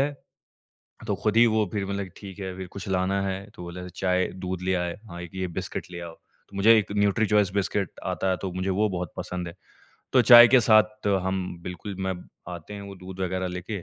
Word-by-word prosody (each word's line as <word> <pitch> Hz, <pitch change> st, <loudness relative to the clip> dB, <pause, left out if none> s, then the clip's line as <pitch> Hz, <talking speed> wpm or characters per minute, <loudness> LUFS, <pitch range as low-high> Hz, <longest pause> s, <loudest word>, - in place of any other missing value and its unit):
है। 145 Hz, +1 st, +1 dB, 1.0 s
तो -, -, +1 dB
ख़ुद 105 Hz, 0 st, +1 dB
ही 120 Hz, -, +8 dB
वो 110 Hz, -1 st, +2 dB
फ़िर 100 Hz, -2 st, -1 dB
मतलब 100 Hz, 0 st, -3 dB
कि 95 Hz, -, -12 dB
ठीक 100 Hz, -1 st, -10 dB
है, 95 Hz, -1 st, -4 dB
फ़िर 95 Hz, -1 st, -6 dB
कुछ 100 Hz, -, -7 dB
लाना 95 Hz, +1 st, +1 dB
है? 95 Hz, +1 st, -4 dB
तो 90 Hz, -, -9 dB
बोले 90 Hz, +1 st, -7 dB
चाय 90 Hz, 0 st, 0 dB, 0.2 s
दूध 90 Hz, -1 st, -3 dB
ले 95 Hz, 0 st, +1 dB
आए, 90 Hz, -1 st, -2 dB
हाँ, 85 Hz, 0 st, -7 dB
1 90 Hz, -, -8 dB
ये 95 Hz, -1 st, -2 dB
बिस्किट -, -, -5 dB
ले 85 Hz, -, -6 dB
आओ। 85 Hz, -1 st, -7 dB
तो 100 Hz, -, -21 dB
मुझे 110 Hz, +3 st, +7 dB
एक 105 Hz, -2 st, 0 dB
न्यूट्रीचॉइस 105 Hz, -1 st, +3 dB
बिस्किट 100 Hz, -2 st, -1 dB
आता 95 Hz, -, -1 dB
है 90 Hz, -, 0 dB
तो 95 Hz, -, -3 dB
मुझे 95 Hz, +1 st, -2 dB
वो 105 Hz, +3 st, +2 dB
बहुत 90 Hz, -3 st, -4 dB
पसंद 90 Hz, -1 st, -4 dB
है। 85 Hz, -, -8 dB, 0.6 s
तो 130 Hz, -, +6 dB
चाय 120 Hz, -1 st, +10 dB
के 130 Hz, +1 st, +6 dB
साथ 110 Hz, -2 st, +3 dB, 0.2 s
हम 95 Hz, 0 st, 0 dB, 0.2 s
बिल्कुल 90 Hz, +3 st, -6 dB
मैं 95 Hz, 0 st, -1 dB, 0.4 s
आते 85 Hz, +4 st, -8 dB
हैं 100 Hz, -, -7 dB
वो 100 Hz, 0 st, -9 dB
दूध 95 Hz, +1 st, -10 dB
वग़ैरह 95 Hz, 0 st, -1 dB
लेके 90 Hz, +2 st, -5 dB
95 Hz, 225 wpm, -26 LUFS, 90-105 Hz, 1.0 s, चाय